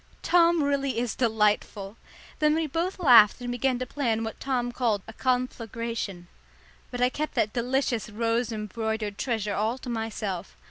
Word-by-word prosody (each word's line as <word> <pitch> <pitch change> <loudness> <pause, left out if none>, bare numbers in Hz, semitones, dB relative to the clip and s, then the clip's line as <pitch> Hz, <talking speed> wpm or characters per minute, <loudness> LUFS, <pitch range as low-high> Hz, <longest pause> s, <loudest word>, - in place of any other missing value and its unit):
Tom 340 -2 +4
really 275 -3 0
is 240 -1 -1
delightful. 210 -3 0 0.4
Then 300 0 +3
we 325 0 0
both 335 +6 -2
laughed 240 - +7
and 245 -1 -4
began 250 +1 0
to 255 - -3
plan 235 -5 -1
what 220 -1 -5
Tom 250 -3 -1
called 230 -6 0
a 225 - -9
conflagration. 230 -6 -2 0.6
But 245 -1 -5
I 250 - +4
kept 305 +4 -4
that 210 - +1
delicious 245 -2 0
rose 230 +2 0
embroidered 215 -1 -3
treasure 220 -5 -1
all 220 +5 0
to 255 - -8
myself. 215 -5 -4
235 Hz, 155 wpm, -27 LUFS, 220-260 Hz, 0.6 s, laughed